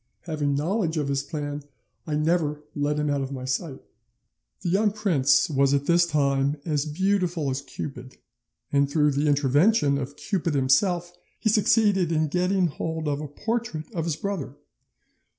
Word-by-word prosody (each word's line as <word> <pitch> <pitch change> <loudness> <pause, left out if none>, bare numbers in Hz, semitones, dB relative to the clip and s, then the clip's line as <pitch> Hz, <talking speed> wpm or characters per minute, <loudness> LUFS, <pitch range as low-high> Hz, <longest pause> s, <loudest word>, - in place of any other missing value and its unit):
Having 150 -4 -1
knowledge 165 +2 0
of 145 -2 -1
his 135 -1 0
plan, 145 -1 -5 0.5
I 150 - -1
never 150 -1 0
let 145 +1 0
him 150 0 0
out 140 -1 0
of 135 0 -4
my 130 -2 -5
sight. 130 +2 -3 0.8
"'The - - -2
young 205 +4 +3
prince 190 -10 +2
was 140 -2 +2
at 140 0 -1
this 170 +1 +4
time 140 -2 +1
as 150 -2 -1
beautiful 175 -3 0
as 130 +1 -3
Cupid, 135 -2 -8 0.5
and 140 -1 +2
through 150 0 +3
the 145 +2 0
intervention 145 - +3
of 140 +1 -5
Cupid 170 -6 -2
himself 175 +6 +2 0.3
he 220 - +1
succeeded 205 -4 +3
in 155 -1 +1
getting 180 +3 +1
hold 160 0 -3
of 145 0 -1
a 150 - -5
portrait 220 0 -4
of 165 -3 -2
his 165 -3 -1
brother. 160 -6 -4
150 Hz, 165 wpm, -25 LUFS, 140-175 Hz, 0.8 s, this